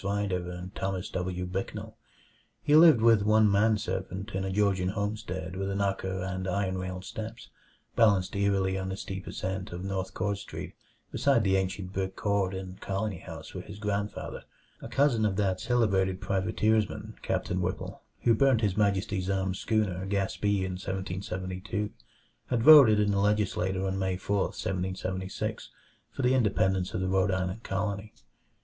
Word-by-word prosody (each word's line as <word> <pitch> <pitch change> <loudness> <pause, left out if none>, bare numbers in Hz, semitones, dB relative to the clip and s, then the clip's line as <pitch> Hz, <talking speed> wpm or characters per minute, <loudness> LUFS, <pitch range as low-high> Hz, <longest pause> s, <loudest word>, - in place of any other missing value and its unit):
Rider 100 -3 -1
and 90 +2 -7
Thomas 95 -1 -3
W. 90 0 -2
Bicknell. 95 +2 -5 0.7
He 150 - +4
lived 155 -7 +8
with 115 -2 +6
one 110 0 +4
man 105 +2 +4
servant 95 +1 -4
in 95 -1 -2
a 95 - -2
Georgian 95 -2 +1
homestead 100 -3 -3
with 95 +1 -2
knocker 95 -2 -1
and 95 0 -3
iron 95 0 -1
railed 95 0 -5
steps, 115 +2 -7 0.5
balanced 100 -5 +3
eerily 95 -1 +1
on 95 0 -3
the 95 - -4
steep 95 -1 -6
ascent 95 0 -4
of 90 +1 -6
North 95 -1 -3
Court 100 +1 -1
Street - - -7 0.4
beside 135 -6 +3
the 95 -1 +3
ancient 95 0 -2
brick 95 0 -2
court 100 -2 0
and 95 0 -7
colony 100 -1 -2
house - - -9
where - - -6
his - - -10
grandfather 105 0 -3 0.4
a - - -6
cousin 135 -6 +2
of 105 -3 +1
that 95 -2 0
celebrated 95 -6 +1
privateersman, 105 +2 0
Captain 90 0 -1
Whipple, 90 +1 -4 0.2
who 115 - +5
burnt 130 0 +3
His 100 -4 +1
Majesty's 100 -2 0
armed 95 -1 0
schooner 100 -5 0
Gaspee 100 0 0
in 90 -1 -4
1772 95 +1 -4 0.6
had 120 -3 0
voted 135 -8 +9
in 105 -1 +2
the 100 - +1
legislature 95 -2 +1
on 95 0 -1
May 95 -1 0
4, 100 +1 0
1776, 95 0 -3 0.4
for 135 - -5
the 125 +1 +4
independence 95 -6 +1
of 95 - -1
the 95 - 0
Rhode 95 +1 +2
Island 95 +3 -1
Colony. 100 0 -3
95 Hz, 160 wpm, -29 LUFS, 95-105 Hz, 0.7 s, voted